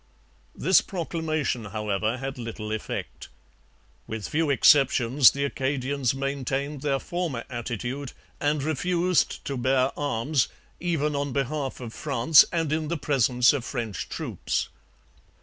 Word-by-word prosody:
This - - +4
proclamation, 160 - -2
however, 105 +2 -1
had 135 0 -5
little 115 -2 -5
effect. 110 - -5 0.8
With 110 -2 -5
few 160 0 0
exceptions 135 -1 +5
the 140 0 -2
Acadians 135 -1 -1
maintained 135 +1 -2
their 140 -2 +1
former 165 -6 -3
attitude 120 +3 -4 0.3
and 145 -1 0
refused 175 +4 0
to 140 - -3
bear 130 +1 +2
arms, 140 0 0 0.3
even 155 -4 0
on 140 -1 -2
behalf 140 0 -2
of 120 -3 -7
France 140 +1 +5
and 165 -3 0
in 155 0 -1
the 170 +2 -2
presence 125 -3 +3
of 140 -4 -2
French 115 - -4
troops. - - -3
135 Hz, 125 wpm, -26 LUFS, 120-150 Hz, 0.8 s, exceptions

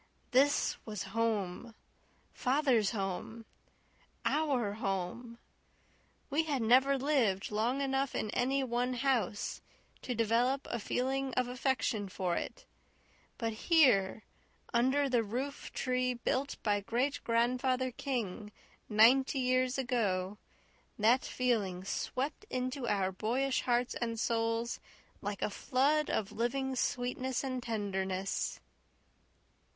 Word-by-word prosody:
This 280 +3 +3
was 210 -4 -5
home 225 -1 -1 0.6
father's 255 -5 +2
home 215 +2 -4 0.8
OUR 270 -9 +1
home! 205 +4 -3 0.9
We 315 +3 +2
had 280 -6 0
never 260 +4 +5
lived 255 -10 +1
long 235 +6 0
enough 270 -1 0
in 215 - -1
any 265 +2 +1
one 250 0 0
house 245 -5 0 0.4
to 250 - -3
develop 235 +5 +2
a 235 - -1
feeling 265 +4 -1
of 255 -1 +1
affection 245 -5 -1
for 180 -2 -1
it; - - -5 0.7
but 225 -2 -2
here, 220 - +3 0.5
under 260 +4 +3
the 245 -3 +2
roof 255 +7 -4
tree 255 -1 0
built 260 +3 -1
by 205 -1 +2
Great 250 +7 0
Grandfather 255 +2 +1
King 230 -6 -3 0.4
ninety 250 +6 +5
years 255 0 +2
ago, 210 -7 0 0.6
that 230 +5 +4
feeling 210 -8 0
swept 270 - -3
into 255 0 -2
our 195 -3 +1
boyish 250 +7 0
hearts 245 0 +1
and 230 -2 -3
souls 230 +1 0 0.4
like 205 0 -3
a - - 0
flood 285 +7 +1
of 205 0 -1
living 265 +4 -1
sweetness 250 +1 -1
and 255 -2 -2
tenderness. 195 -4 -2
245 Hz, 115 wpm, -32 LUFS, 215-265 Hz, 0.9 s, never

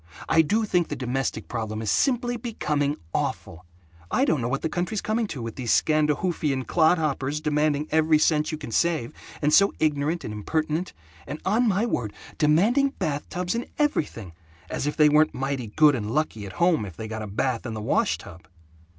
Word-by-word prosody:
I 160 - +5
do 215 +8 +1
think 180 -5 +1
the - - -4
domestic 130 +1 -3
problem 110 -2 -4
is 110 -3 -1
simply 245 -2 +1
becoming 150 -11 -1 0.2
awful. 85 +2 -3 0.4
I - - +2
don't 155 -5 +1
know 115 - -1
what 135 +3 -2
the - - +1
country's 180 +6 -2
coming 220 +2 -1
to, 135 -10 -6
with 115 -1 -6
these 125 -3 -1
Scandahoofian 150 -2 +1
clodhoppers 155 -4 +1
demanding 150 -1 0
every 160 0 +4
cent 150 0 +2
you 155 - -3
can 150 -6 -8
save, 160 -3 0 0.3
and 150 +1 +2
so 200 0 +5
ignorant 155 +2 0
and 105 - -5
impertinent, 155 - -2 0.3
and 150 - -5
on 225 +5 +2
my 205 +2 +2
word, 115 - -2 0.3
demanding 210 - +3
bath 150 -6 -3
tubs 180 -1 -2
and 235 +1 -3
everything 145 - -1 0.4
as 140 - -2
if 150 - -2
they 150 -1 +6
weren't 150 +1 +3
mighty 135 -2 -2
good 150 +7 +4
and 105 -5 -3
lucky 115 -7 -2
at 95 - -9
home 170 - +2
if 90 -6 -8
they 110 - -5
got 110 0 -5
a 105 - -5
bath 115 +4 -1
in 115 - -5
the - - -4
wash 105 - +1
tub." 85 +2 -13
150 Hz, 195 wpm, -25 LUFS, 125-175 Hz, 0.4 s, they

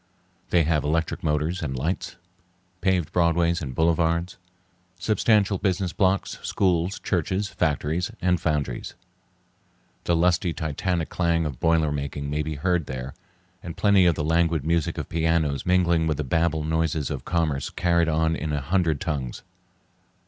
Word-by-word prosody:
They 85 -2 +4
have 75 -2 +1
electric 80 +2 -1
motors 80 +3 0
and 65 -5 -3
lights, 95 +7 -3 0.7
paved 95 -5 +1
broadways 85 0 +2
and 65 -4 -5
boulevards, 85 +1 +1 0.6
substantial 105 0 +2
business 95 -2 -1
blocks, 95 -1 0
schools, 90 -1 0
churches, 95 +2 -1
factories, 80 +3 -1
and 90 -1 +1
foundries. 75 -6 -2 1.1
The 85 - +2
lusty, 90 0 +2
titanic 80 +3 -2
clang 85 -2 +1
of 70 -5 -5
boiler 80 -2 +2
making 70 0 -4
may 75 +1 0
be 75 0 -4
heard 90 +1 0
there, 65 0 -5 0.5
and 85 -2 -8
plenty 100 -3 +4
of 85 - +3
the 75 - -2
languid 80 -1 +1
music 85 -1 0
of - - -4
pianos 80 -4 0
mingling 85 -3 +3
with 75 -2 0
the 75 - -2
babel 80 +2 0
noises 80 -2 -1
of 70 -3 -4
commerce 80 -5 -1
carried 85 -1 +1
on 80 +1 +1
in 80 -1 -3
a 75 - 0
hundred 80 0 0
tongues. 70 -7 -3
80 Hz, 150 wpm, -25 LUFS, 75-90 Hz, 1.1 s, They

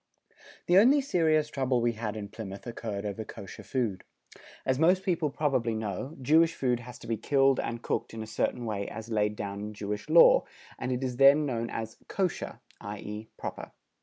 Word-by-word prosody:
The 180 +2 +6
only 265 +7 +6
serious 160 - +2
trouble 130 -3 0
we 120 0 +2
had 110 -1 -4
in 105 -1 -5
Plymouth 100 -3 -8
occurred 110 -4 -5
over 105 +2 -3
Kosher 100 -2 -9
food. 115 -8 -2 0.6
As 130 0 +1
most 180 +4 +4
people 170 -5 +1
probably 135 -6 0
know, 110 - -4
Jewish 160 +5 +4
food 125 -5 0
has 120 0 -10
to - - -12
be 115 -1 -1
killed 135 0 +3
and 115 0 -3
cooked 115 - -2
in 110 - -4
a - - -6
certain 110 +2 -2
way 100 -3 -2
as 110 +1 -7
laid 105 -1 +1
down 100 -1 -5
in 105 +1 -5
Jewish 105 +5 -4
Law, 165 +2 +7 0.3
and 125 - -2
it 125 +1 -1
is 125 -2 -2
then 140 +3 +7
known 115 -4 -2
as 110 0 -5
"kosher," 190 -3 -2 0.2
i.e. 105 +1 -7
proper. - - -6
120 Hz, 190 wpm, -29 LUFS, 105-145 Hz, 0.6 s, Law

